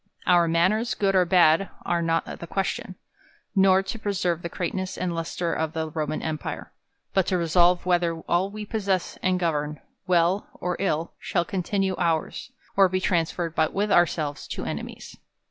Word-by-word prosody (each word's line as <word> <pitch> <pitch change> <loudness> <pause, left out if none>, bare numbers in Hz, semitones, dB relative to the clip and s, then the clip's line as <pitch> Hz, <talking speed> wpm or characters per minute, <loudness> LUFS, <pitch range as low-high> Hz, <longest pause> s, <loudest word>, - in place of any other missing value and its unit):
Our 175 -2 +5
manners, 185 +8 +2
good 195 -1 +1
or 185 -1 +5
bad, 175 0 +4 0.2
are 175 -1 +1
not 165 0 +1
the 170 - -7
question, 190 0 -2 0.6
nor 190 0 +5
to 195 +4 -5
preserve 185 -5 -1
the 170 - -4
greatness 185 +2 -3
and 180 -1 -2
lustre 165 +1 -2
of 160 0 -2
the 160 -1 -3
Roman 155 -1 -3
empire: 155 -2 -4 0.4
but 190 -2 +2
to 185 - +1
resolve 175 +1 +3
whether 175 -2 +2
all 175 +4 +1
we 210 +1 -7
possess 200 -4 -1
and 185 -1 +1
govern, 150 -3 -1 0.3
well 180 +2 +2
or 180 0 -2
ill, 170 -4 -1
shall 175 - -1
continue 195 +1 -1
our's, 170 +7 -1 0.2
or 195 -1 +5
be 185 +1 0
transferred 170 -2 0 0.2
with 205 +2 0
ourselves 155 -4 +1
to - - -5
enemies. - - -6
175 Hz, 165 wpm, -25 LUFS, 165-190 Hz, 0.6 s, Our